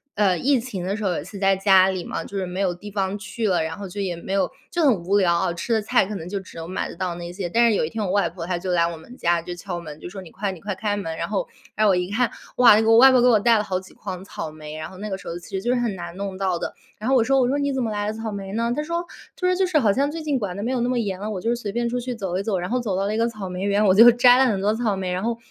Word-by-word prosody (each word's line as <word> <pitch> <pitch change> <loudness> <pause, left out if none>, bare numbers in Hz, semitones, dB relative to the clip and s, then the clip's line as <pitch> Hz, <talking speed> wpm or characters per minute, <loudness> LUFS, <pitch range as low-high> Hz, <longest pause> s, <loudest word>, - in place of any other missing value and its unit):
呃， 200 -4 +3
疫 270 - +2
情 215 -7 -5
的 195 +2 -1
时 220 - -5
候， 190 - +1
有 - - -3
一 - - -9
次 200 +4 -10
在 195 -1 +3
家 190 -1 +5
里 185 -2 -3
嘛， 165 - -4
就 200 - -10
是 190 - -1
没 180 +2 -5
有 180 -2 +1
地 205 +4 -10
方 195 -1 -1
去 220 +1 -3
了， 175 -4 +2
然 160 +2 -4
后 200 -1 -6
就 200 +3 -5
也 180 -3 -2
没 190 +3 -6
有 195 -2 +1 0.2
就 345 - 0
很 220 - +3
无 200 +3 +2
聊 175 -3 +3
啊， 170 - 0
吃 200 +7 -5
的 220 - +3
菜 205 - +2
可 210 - -5
能 170 -2 -6
就 200 0 -2
只 185 - -13
能 165 0 -6
买 185 - -3
得 - - -9
到 180 -1 -2
那 175 0 -7
些 185 -2 -4
但 235 +4 +4
是 215 - +2
有 - - +1
一 - - -4
天 220 -2 -3
我 185 - -2
外 200 -3 +2
婆， 170 0 -7
她 180 -1 -1
就 180 +1 -3
来 170 -1 +3
我 170 -1 -5
们 240 +10 -13
家， 170 0 +1
就 175 - -6
敲 175 -1 -5
门， 155 -2 -9
就 - - -8
说 195 +1 -8
你 170 - -12
快 195 0 -3
你 180 - -9
快 200 -1 -3
开 205 +1 -1
门， 165 -5 -4
然 - - -2
后 - - -1 0.3
然 215 - +2
后 - - +5
我 - - +3
一 180 +1 -1
看 230 +2 +1 0.3
哇， 245 -3 +8
那 220 - +4
个 225 +1 +5
外 265 +2 +9
婆 250 -2 +5
给 250 - +5
我 225 -4 +5
带 230 +1 +4
了 - - 0
好 185 -3 -2
几 190 - -15
筐 190 -2 -7
草 160 -4 -6
莓， 155 0 -9
然 155 0 -6
后 185 - -12
那 210 +2 -5
个 190 - -3
时 - - -12
候 170 - -4
其 175 - -12
实 190 - -2
就 240 - -2
是 245 - +1
很 230 -5 -1
难 175 -1 -7
弄 195 -1 -4
到 190 -3 0
的。 - - -4 0.3
然 220 - -4
后 270 - +4
我 235 - +5
说 270 +2 +3
我 245 - +3
说 280 +3 0
你 280 0 0
怎 260 -2 -1
么 220 - -2
来 205 0 -2
了 215 - -1
草 220 0 -5
莓 195 -1 -6
呢？ 230 +1 0
她 300 - -1
说 340 +2 -2 0.3
她 365 - -1
说 365 - +3
就 375 0 +2
是 335 -4 +2
好 215 -8 +3
像 280 +4 +1
最 320 +1 -5
近 285 -4 0
管 195 -3 -4
得 205 - -4
没 245 - -1
有 255 - 0
那 245 - 0
么 250 - 0
严 195 -5 -2
了， 210 +1 -4
我 195 -4 -3
就 235 +1 +1
随 215 -4 -5
便 235 +2 -1
出 245 +1 -2
去 245 0 -4
走 190 -4 -3
一 - - -3
走， 200 -4 0
然 180 +2 -3
后 250 - +1
走 210 -6 -2
到 195 - 0
那 215 - -1
个 230 +1 +2
草 210 -4 -7
莓 180 +1 -5
园， 205 +1 +2
我 185 - +5
就 230 +4 +9
摘 245 +1 +6
了 265 - +5
很 205 -6 +1
多 205 +2 +1
草 220 -3 0
莓， 185 -1 -3
然 185 - -2
后， 230 +1 -1
200 Hz, 390 characters per minute, -23 LUFS, 185-235 Hz, 0.3 s, 外